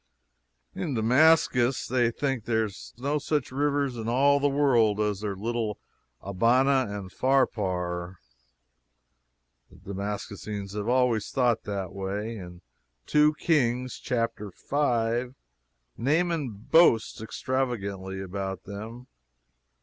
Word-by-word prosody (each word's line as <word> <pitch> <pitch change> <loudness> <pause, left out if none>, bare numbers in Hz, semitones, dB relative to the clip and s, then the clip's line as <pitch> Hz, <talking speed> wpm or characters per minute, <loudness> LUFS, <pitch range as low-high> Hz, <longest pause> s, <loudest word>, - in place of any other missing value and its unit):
In 150 -7 -3
Damascus 125 +1 +3
they 120 -1 +2
think 130 -2 -2
there 110 -1 +1
are - - -4 0.3
no 140 +4 -1
such 150 -1 -1
rivers 140 -2 0
in 115 0 -3
all 140 +4 +4
the 145 0 +2
world 120 -7 +3
as 105 -2 0
their 105 -2 -3
little 110 +1 -2 0.4
Abana 125 +6 +2
and 100 -2 -6
Pharpar. 95 -9 0 1.5
The 100 - -10
Damascenes 100 0 -5
have 105 +1 -4
always 125 -3 +2
thought 125 -4 +1
that 100 -3 -4
way. 100 +4 -4
In 90 -3 -10 0.4
2 150 0 +4
Kings, 130 -6 0
chapter 115 -4 -2 0.2
v., 120 -3 +1 0.6
Naaman 155 +2 +1
boasts 110 +2 +3
extravagantly 100 -6 -3
about 95 0 -5
them. 110 +5 -8
115 Hz, 110 wpm, -27 LUFS, 100-135 Hz, 1.5 s, all